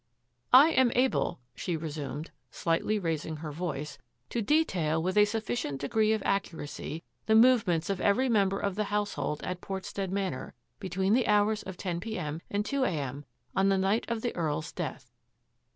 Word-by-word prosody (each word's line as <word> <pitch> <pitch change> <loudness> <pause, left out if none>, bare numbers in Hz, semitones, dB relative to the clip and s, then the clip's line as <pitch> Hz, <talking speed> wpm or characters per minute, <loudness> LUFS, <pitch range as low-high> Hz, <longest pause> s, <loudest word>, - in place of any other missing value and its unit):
" - - -47
I 275 +5 +9
am 260 -5 +4
able," 255 - +1
she 165 +7 -2
resumed, 155 0 -5 0.2
slightly 170 +6 0
raising 160 -4 -2
her 155 0 -6
voice, 150 -2 -4
" 120 +2 -46
to 235 - 0
detail 190 - +2
with 185 +3 -1
a 210 0 +7
sufficient 215 - -2
degree 215 +9 +2
of 220 -2 0
ac 195 - +3
curacy 160 0 -6 0.2
the 220 - +4
movements 220 -9 +5
of 195 -3 -2
every 245 +6 +3
member 200 -5 +2
of 200 -1 -1
the 210 +2 -1
household 205 -7 -2
at 180 -1 -4
Portstead 195 0 -4
Manor 190 -8 -3 0.2
between 190 +1 0
the 250 +1 +3
hours 210 +1 +3
of 190 -1 -8
ten 175 -3 -3
p. 220 +4 -4
m. 155 -2 -4
and 205 +1 -1
two 280 +1 0
a. - - +2
m. 145 -3 -4 0.3
on 195 +1 +3
the 195 - +3
night 195 +4 +1
of 230 -1 -1
the 240 - -2
Earl's 155 -2 -2
death. - - -5
190 Hz, 185 wpm, -29 LUFS, 160-215 Hz, 0.3 s, I